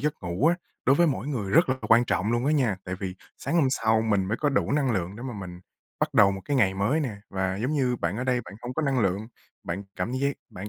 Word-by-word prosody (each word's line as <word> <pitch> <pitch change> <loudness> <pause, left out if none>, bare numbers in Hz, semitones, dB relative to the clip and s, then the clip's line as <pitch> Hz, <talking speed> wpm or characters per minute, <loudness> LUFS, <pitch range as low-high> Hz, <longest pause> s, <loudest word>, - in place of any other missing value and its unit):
giấc 150 +1 0
ngủ 90 - 0
á, 170 - +5 0.3
đối 135 - +5
với 170 +1 +5
mỗi 140 -2 -1
người 110 -9 -2
rất 165 - +5
là 130 - +2
quan 115 +2 +6
trọng 105 +1 0
luôn 120 +2 0
á 150 - +3
nha. 125 -10 +2
Tại 90 - -4
vì 95 -1 -5 0.2
sáng - - -3
hôm 165 -5 +4
sau 110 -4 +2
mình 105 -4 +1
mới 100 +4 -1
có 145 - +1
đủ 135 - +1
năng 140 -3 +2
lượng 95 -2 -2
để 120 - -8
mà 130 -1 -4
mình 90 -3 -8 0.4
bắt - - 0
đầu 100 -1 +6
một 95 - -5
cái 145 - 0
ngày 100 -7 +3
mới 105 +11 +1
nè. 130 -8 -2
Và 95 0 -1
giống 125 +9 -1
như 130 -4 +1
bạn 90 -1 -2
ở 125 - -2
đây, 125 -1 +1
bạn 100 - -11
hông 125 +1 -5
có 155 - -1
năng 135 -3 +1
lượng, 100 +1 0 0.4
bạn 85 +4 -3
cảm 90 +7 -2
giác 140 +2 0 0.2
bạn 100 +3 -7
115 Hz, 280 wpm, -26 LUFS, 95-135 Hz, 0.4 s, quan